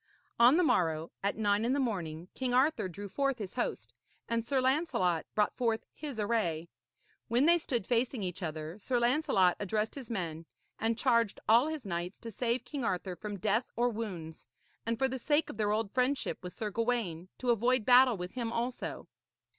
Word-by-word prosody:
On 245 +6 +7
the 360 - +4
morrow, 165 - +1
at 200 +1 -1
nine 205 -1 +2
in 245 +3 +1
the 285 - +1
morning, 175 - -2
King 250 -2 -1
Arthur 270 -4 +3
drew 200 +4 -7
forth 275 +5 0
his 205 -5 -6
host, 245 - -3 0.3
and 230 0 0
Sir 270 +3 0
Lancelot 255 - +1
brought 210 -1 +2
forth 230 -3 0
his 285 -7 -6
array. 175 -7 0 0.6
When 245 +4 +3
they 340 +1 +6
stood 240 - -2
facing 240 -1 0
each 185 +1 -4
other, 160 +2 -5
Sir 245 +4 0
Lancelot 240 - +3
addressed 210 +2 -1
his 265 -4 -8
men 165 -7 -4 0.3
and 225 0 0
charged 235 -5 +2
all 235 +6 +6
his 315 -5 -4
knights 175 0 -4
to 230 - -7
save 235 +3 -1
King 285 -4 -4
Arthur 185 -3 -2
from 205 +3 -6
death 215 +5 0
or 240 +1 +2
wounds, 185 - -6 0.4
and 230 0 0
for 265 - +2
the 260 0 -4
sake 295 +4 +1
of - - -12
their 210 -2 +1
old 215 -1 0
friendship 260 +2 0
with 180 -1 -7
Sir 215 -2 -4
Gawaine, 215 -7 -1
to 250 -1 +1
avoid 240 0 +2
battle 250 -2 +6
with 180 0 -5
him 235 -3 -3
also. 240 +2 -3
230 Hz, 190 wpm, -31 LUFS, 190-255 Hz, 0.6 s, On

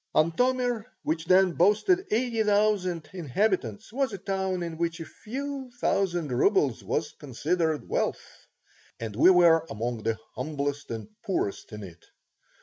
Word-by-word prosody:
Antomir, 245 +7 +2 0.2
which 160 +1 -1
then 185 +1 +5
boasted 215 - +3
eighty 230 0 +1
thousand 200 -6 +1
inhabitants, 180 - -1
was 270 0 0
a 200 - -5
town 190 -1 -2
in 165 -1 -6
which 170 0 -1
a 165 - -5
few 270 - -6
thousand 175 - 0
rubles 135 - +2
was 150 0 -1
considered 155 +3 -2
wealth, - - -3 0.5
and 110 -3 -5
we 130 - +6
were 170 -3 +6
among 115 +1 -3
the 115 0 -1 0.2
humblest 145 -1 -3
and 115 -2 -5 0.2
poorest 190 - -2
in 105 -1 -7
it. 85 -3 -12
175 Hz, 140 wpm, -27 LUFS, 145-210 Hz, 0.5 s, we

